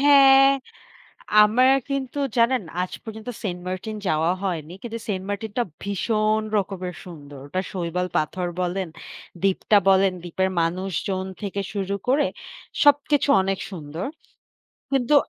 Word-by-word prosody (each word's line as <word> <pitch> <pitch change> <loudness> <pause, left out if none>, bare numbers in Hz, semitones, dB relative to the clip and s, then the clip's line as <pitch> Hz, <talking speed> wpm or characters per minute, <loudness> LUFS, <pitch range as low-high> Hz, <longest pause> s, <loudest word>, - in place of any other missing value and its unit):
হ্যাঁ 275 -1 +7 0.9
আমরা 225 +5 +4 0.3
কিন্তু 275 0 -2 0.2
জানেন 240 +1 +3 0.2
আজ 180 - -4
পর্যন্ত 220 +1 -8 0.2
সেন্টমার্টিন 185 +3 -4
যাওয়া 160 +3 +2
হয়নি 170 -4 -3
কিন্তু 230 -1 -5
সেন্টমার্টিন 205 +2 -3
টা 240 - +3 0.2
ভীষণ 215 +2 +1 0.2
রকমের 185 -2 -4
সুন্দর। 145 -6 -11
ওটা 185 +6 -2
শৈবাল 180 0 -2
পাথর 180 +4 -1 0.2
বলেন, 180 0 -2 0.5
দ্বীপটা 195 +2 +3
বলেন 190 0 +4
দ্বীপের 190 +2 -1
মানুষজন 185 +2 -1 0.2
থেকে 200 0 -3
শুরু 200 -1 -2
করে 280 +3 +3 0.6
সবকিছু 290 0 +4
অনেক 195 0 -1
সুন্দর। 160 - -6 0.9
কিন্তু 270 +1 +2
195 Hz, 120 wpm, -24 LUFS, 180-230 Hz, 0.9 s, হ্যাঁ